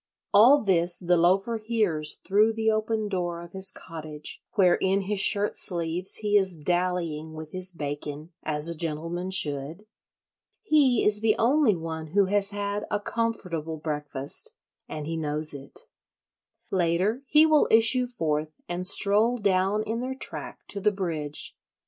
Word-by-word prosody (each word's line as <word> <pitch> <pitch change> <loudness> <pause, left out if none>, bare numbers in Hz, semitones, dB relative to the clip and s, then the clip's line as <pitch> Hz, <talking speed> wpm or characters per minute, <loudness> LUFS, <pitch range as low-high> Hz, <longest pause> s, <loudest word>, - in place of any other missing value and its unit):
All 245 +7 +6
this 175 -3 +3
the 180 -1 +2
Loafer 195 +7 +2
hears 210 -9 -1
through 210 +3 +3
the 220 0 +1
open 215 0 -1
door 175 -3 -3
of 170 0 -11
his 190 0 +1
cottage, 155 -4 -8
where 185 -5 +4
in 190 +2 +1
his 200 +1 -3
shirt 205 +1 +3
sleeves 175 0 -1
he 210 -1 0
is 190 -4 +2
dallying 170 -2 -2
with 155 -1 -9
his 185 0 -1
bacon, 145 0 -6
as 150 +1 -1
a 170 - -1
gentleman 165 +3 -3
should. 155 +1 0 0.8
He 285 - +3
is 210 0 +3
the 220 -1 +3
only 250 -2 +3
one 160 -1 -6
who 200 -1 +5
has 200 +1 +1
had 205 0 -3
a 205 - -1
comfortable 180 -8 -3
breakfast—and 150 - -5
he 165 +1 -4
knows 155 0 -2
it. 140 -1 -9 0.9
Later 185 +6 0
he 305 +3 +6
will 310 -2 +4
issue 230 +3 +5
forth 155 -10 -2 0.2
and 180 +1 -2
stroll 215 +5 +4
down 200 0 +1
in 225 +2 -3
their 260 +1 -4
track 270 - -6
to 200 - -5
the 210 - +3
bridge. 160 -7 -4
185 Hz, 150 wpm, -26 LUFS, 160-215 Hz, 0.9 s, All